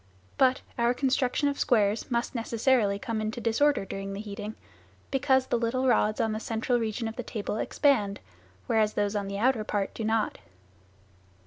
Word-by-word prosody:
But 260 Hz, -1 st, +4 dB, 0.2 s
our 235 Hz, +1 st, +3 dB
construction 265 Hz, +1 st, +1 dB
of 285 Hz, 0 st, -2 dB
squares 215 Hz, -3 st, +2 dB
must 235 Hz, 0 st, -1 dB
necessarily 230 Hz, -3 st, +1 dB
come 220 Hz, +1 st, -3 dB
into 215 Hz, +3 st, -3 dB
disorder 240 Hz, +1 st, +2 dB
during 195 Hz, +1 st, -5 dB
the 195 Hz, -, -5 dB
heating, 210 Hz, 0 st, -6 dB, 0.6 s
because 265 Hz, -1 st, +3 dB
the 240 Hz, -, 0 dB
little 250 Hz, +3 st, 0 dB
rods 215 Hz, -3 st, +2 dB
on 220 Hz, -, +1 dB
the 215 Hz, -, -2 dB
central 230 Hz, +2 st, 0 dB
region 225 Hz, 0 st, -2 dB
of 225 Hz, +3 st, -7 dB
the -, -, -2 dB
table 215 Hz, -2 st, -4 dB
expand, 215 Hz, -7 st, +1 dB, 0.5 s
whereas 215 Hz, -1 st, +2 dB
those 205 Hz, 0 st, 0 dB
on 200 Hz, -1 st, -1 dB
the 200 Hz, 0 st, -4 dB
outer 235 Hz, 0 st, +2 dB
part 205 Hz, -2 st, -2 dB
do 225 Hz, -, -5 dB
not. 220 Hz, 0 st, 0 dB
225 Hz, 175 wpm, -28 LUFS, 210-250 Hz, 0.6 s, But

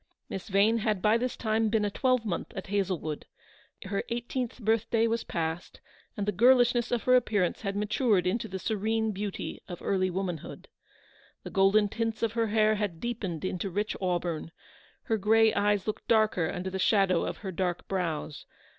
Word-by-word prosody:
Miss 195 Hz, -, -6 dB
Vane 210 Hz, +3 st, +3 dB
had 215 Hz, -2 st, 0 dB
by 210 Hz, +4 st, +3 dB
this 250 Hz, +2 st, -1 dB
time 220 Hz, -1 st, +1 dB
been 215 Hz, -1 st, +1 dB
a 205 Hz, -, -1 dB
twelvemonth 240 Hz, -6 st, 0 dB
at 190 Hz, -, -4 dB
Hazlewood. 185 Hz, -6 st, -2 dB, 0.6 s
Her 200 Hz, +1 st, -2 dB
eighteenth 240 Hz, +1 st, -3 dB
birthday 225 Hz, 0 st, +1 dB
was 230 Hz, 0 st, 0 dB
past, 165 Hz, 0 st, -4 dB, 0.4 s
and 205 Hz, -, -1 dB
the 210 Hz, -, +1 dB
girlishness 245 Hz, +2 st, +4 dB
of 240 Hz, -2 st, 0 dB
her 255 Hz, -, +5 dB
appearance 210 Hz, -7 st, +1 dB
had 195 Hz, -2 st, -3 dB
matured 210 Hz, -2 st, +1 dB
into 190 Hz, +6 st, 0 dB
the 190 Hz, -, -5 dB
serene 220 Hz, +2 st, -1 dB
beauty 200 Hz, 0 st, -5 dB
of 175 Hz, -, -7 dB
early 185 Hz, -1 st, 0 dB
woman 180 Hz, -2 st, -2 dB
hood. -, -, -11 dB, 0.7 s
The -, -, -8 dB
golden 195 Hz, +2 st, +4 dB
tints 225 Hz, +2 st, -3 dB
of 230 Hz, -, +2 dB
her 230 Hz, -1 st, +1 dB
hair 215 Hz, 0 st, +3 dB
had 205 Hz, -6 st, -2 dB
deepened 195 Hz, -8 st, -4 dB
into 185 Hz, +1 st, -2 dB
rich 205 Hz, +4 st, -2 dB
auburn, 175 Hz, -3 st, -2 dB, 0.5 s
her 225 Hz, -3 st, 0 dB
grey 220 Hz, +2 st, +4 dB
eyes 205 Hz, -1 st, +1 dB
looked 215 Hz, -, -4 dB
darker 215 Hz, -7 st, +3 dB
under 185 Hz, +1 st, -4 dB
the 190 Hz, -, -3 dB
shadow 190 Hz, -3 st, +3 dB
of -, -, -3 dB
her 190 Hz, -, -2 dB
dark 180 Hz, -1 st, -2 dB
brows. 165 Hz, -6 st, -3 dB
205 Hz, 175 wpm, -29 LUFS, 185-225 Hz, 0.7 s, her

